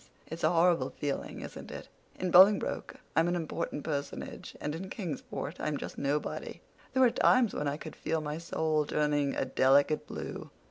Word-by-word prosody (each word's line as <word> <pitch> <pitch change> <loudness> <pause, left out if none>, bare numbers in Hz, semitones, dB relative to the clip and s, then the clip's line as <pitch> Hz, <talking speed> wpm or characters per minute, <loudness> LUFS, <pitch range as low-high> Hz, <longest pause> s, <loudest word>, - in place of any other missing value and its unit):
It's 165 +2 -8
a - - +5
horrible 170 0 +3
feeling, 145 -2 -4
isn't - - -8
it? - - -8 0.3
In 185 -1 -1
Bolingbroke 195 +4 +5 0.2
I'm 165 +1 +4
an 175 - +1
important 165 -3 -3
personage, 145 -3 -5
and 150 - -3
in 185 +4 -6
Kingsport 170 - -5
I'm 150 -1 -1
just - - -7
nobody! 145 +2 -2 0.3
There 260 0 +4
were 245 - +6
times 240 -2 +4
when 150 - -2
I 140 +1 -1
could 155 -1 -9
feel 160 0 -1
my 150 +1 -4
soul 160 -2 0
turning 145 -2 +1
a - - 0
delicate 135 +3 +3
blue. - - -6
155 Hz, 175 wpm, -31 LUFS, 145-175 Hz, 0.3 s, were